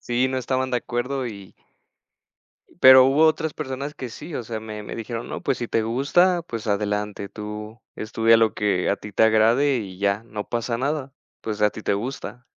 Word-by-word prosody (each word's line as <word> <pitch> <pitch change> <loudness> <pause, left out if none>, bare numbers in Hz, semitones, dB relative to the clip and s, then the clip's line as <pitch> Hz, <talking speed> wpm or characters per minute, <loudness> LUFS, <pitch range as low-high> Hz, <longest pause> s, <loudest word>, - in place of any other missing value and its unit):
Sí, 125 +2 0
no 130 - -1
estaban 130 +1 -1
de 125 - +1
acuerdo 125 +3 -3
y 100 -4 -9 1.3
pero 130 0 +10
hubo 145 +4 +4
otras 160 -1 +1
personas 140 0 -5
que 125 - -7
sí. 155 +7 -8
O 120 - -3
sea, 110 0 -5
me 105 -1 -7
me - - -7
dijeron 115 +1 -5
no, - - -5
pues - - 0
si 120 - -4
te 115 - 0
gusta, 170 +10 +2
pues 115 -8 -6
adelante, 105 0 -2
tú 105 +1 -8 0.2
estudia 115 +1 +3
lo 115 -1 +3
que 100 -4 0
a - - +2
ti 105 - -10
te 105 - +3
agrade 115 +5 +4
y 95 -5 -6
ya, 100 +2 0
no 105 -2 -7
pasa 115 0 -2
nada. 140 0 -2 0.3
Pues 105 -1 -4
a 105 - +5
ti 110 - -9
te - - +1
gusta. 120 +1 -5
115 Hz, 200 wpm, -23 LUFS, 105-130 Hz, 1.3 s, pero